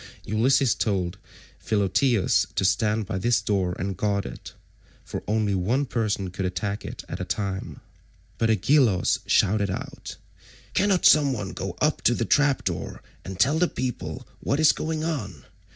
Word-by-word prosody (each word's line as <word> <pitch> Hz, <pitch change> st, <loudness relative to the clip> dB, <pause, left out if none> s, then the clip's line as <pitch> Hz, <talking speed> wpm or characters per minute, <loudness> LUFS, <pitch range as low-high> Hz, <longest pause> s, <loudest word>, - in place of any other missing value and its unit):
Ulysses 125 Hz, +4 st, +3 dB
told 95 Hz, -3 st, -1 dB, 0.4 s
Philoetius 100 Hz, -1 st, +2 dB
to 95 Hz, -, +1 dB
stand 105 Hz, +3 st, +1 dB
by 95 Hz, -1 st, -3 dB
this 120 Hz, +5 st, +2 dB
door 95 Hz, -4 st, -1 dB
and 95 Hz, +2 st, -3 dB
guard 100 Hz, +1 st, -1 dB
it, -, -, -9 dB, 0.5 s
for -, -, -5 dB
only 105 Hz, -1 st, +1 dB
one 110 Hz, +10 st, +1 dB
person 105 Hz, -7 st, -2 dB
could 95 Hz, +1 st, -4 dB
attack 95 Hz, +3 st, -3 dB
it -, -, -7 dB
at -, -, -6 dB
a -, -, -2 dB
time. 100 Hz, -2 st, -4 dB, 0.6 s
But 115 Hz, -, +2 dB
Agelaus 110 Hz, -1 st, +3 dB
shouted 100 Hz, 0 st, +2 dB
out, 95 Hz, -, -6 dB, 0.6 s
"Cannot 195 Hz, -2 st, +2 dB
some 145 Hz, -3 st, +6 dB
one 100 Hz, -6 st, -5 dB
go 95 Hz, -2 st, -5 dB
up 150 Hz, 0 st, +1 dB
to 120 Hz, -, +3 dB
the 115 Hz, -, -1 dB
trap 145 Hz, 0 st, +2 dB
door -, -, -4 dB, 0.2 s
and 95 Hz, -1 st, -8 dB
tell 140 Hz, +9 st, +3 dB
the 180 Hz, -, +3 dB
people 130 Hz, -6 st, -5 dB
what 140 Hz, -, -1 dB
is 155 Hz, -1 st, +6 dB
going 155 Hz, -1 st, -3 dB
on? 105 Hz, -, -4 dB
105 Hz, 160 wpm, -25 LUFS, 95-130 Hz, 0.6 s, some